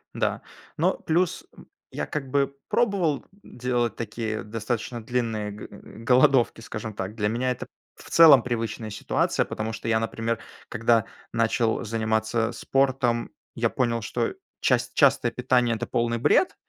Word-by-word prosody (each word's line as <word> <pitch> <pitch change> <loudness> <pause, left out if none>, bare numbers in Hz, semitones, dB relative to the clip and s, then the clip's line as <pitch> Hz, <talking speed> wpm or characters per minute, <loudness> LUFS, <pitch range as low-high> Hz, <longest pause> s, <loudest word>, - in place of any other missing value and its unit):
Да, - - -1 0.4
но - - +3
плюс, 170 +2 0
м, - - -14 0.2
я, - - -3
как 135 -3 -4
бы, 140 0 +1
пробовал, 190 - +1 0.2
м, - - -15
делать 120 -3 0
такие 110 -1 -4
достаточно 115 +2 -4
длинные 110 -3 -2
г 105 - -9 0.4
голодовки, 130 -2 +4
скажем 110 0 -6
так. 95 +1 -5
Для 105 -2 0
меня 120 +4 0
это, 125 - -5 0.3
в - - -14
целом, 150 -7 +8
привычная 115 -2 -3
ситуация, 105 - 0
потому 110 +1 -4
что 115 - -6
я, 110 -1 +3
например, 115 0 -2 0.3
когда 115 -1 +2 0.3
начал 115 0 +1
заниматься 110 0 0
спортом, 130 -3 0 0.2
я 115 0 +1
понял, 115 -2 0
что 105 - -2 0.3
част - - +1
частое - - +4
питание- 125 -2 +1
это 110 - -3
полный 115 0 0
бред, 245 - +3
115 Hz, 145 wpm, -25 LUFS, 110-125 Hz, 0.4 s, целом